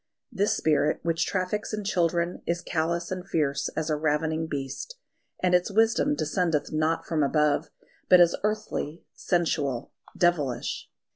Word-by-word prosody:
This 200 +2 +1
spirit 150 -1 +2
which 165 0 0
traffics 195 +3 -2
in 210 - -5
children 175 -2 0
is 170 +1 -1
callous 170 +1 -1
and 185 -1 -3
fierce 150 -6 0
as 160 0 -1
a - - +2
ravening 155 +1 0
beast; 140 - -5 0.5
and 180 -1 +3
its 180 +2 +3
wisdom 225 +7 +3
descendeth 165 - 0
not 155 +1 0
from 160 -2 0
above, 150 0 +2 0.4
but 180 - +8
is 175 -1 +5
earthly, 210 -7 -2
sensual, 155 -8 -1 0.3
devilish. 145 -9 0
165 Hz, 140 wpm, -27 LUFS, 150-180 Hz, 0.5 s, but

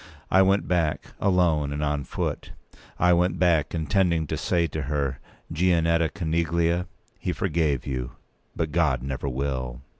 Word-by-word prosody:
I 95 - +6
went 95 +1 +3
back, 85 -4 -1
alone 85 -7 +2
and 75 +1 -2
on 75 -2 -1
foot. - - -4 0.4
I 90 0 +4
went 90 +1 +2
back, 85 -4 +2
intending 85 0 +1
to - - -3
say 85 -1 +1
to 80 -1 -4
her, 70 -1 -2 0.3
"Gianetta 85 -1 +2
Coneglia, 85 0 0 0.3
he 90 - -2
forgave 80 -8 0
you; 65 -3 -4 0.4
but 80 -2 -2
God 70 -7 +1
never 70 +1 -3
will." 65 -2 -3
80 Hz, 145 wpm, -25 LUFS, 70-90 Hz, 0.4 s, I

